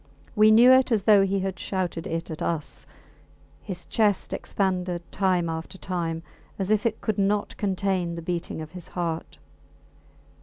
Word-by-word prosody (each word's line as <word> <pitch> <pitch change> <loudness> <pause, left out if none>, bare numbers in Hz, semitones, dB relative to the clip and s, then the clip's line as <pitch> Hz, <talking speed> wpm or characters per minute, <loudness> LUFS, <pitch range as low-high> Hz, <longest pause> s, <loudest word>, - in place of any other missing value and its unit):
We 215 0 +6
knew 235 +4 +8
it 260 0 +5
as 215 -4 +2
though 205 -1 +6
he 195 0 0
had 190 -1 -3
shouted 180 -4 -3
it 165 0 -4
at 155 - -6
us. 160 -3 -3 0.7
His 180 -4 -7
chest 210 -3 +1
expanded 180 -3 -1
time 185 -3 +1
after 165 +3 -5
time, 170 -3 -3 0.3
as 195 +1 -1
if 215 +1 +3
it 220 -1 -4
could 215 -2 -1
not 205 +1 0
contain 190 -3 -1
the 170 - -7
beating 170 -2 -3
of 155 - -11
his 180 -2 -9
heart. 165 -2 -3
185 Hz, 160 wpm, -25 LUFS, 170-205 Hz, 0.7 s, knew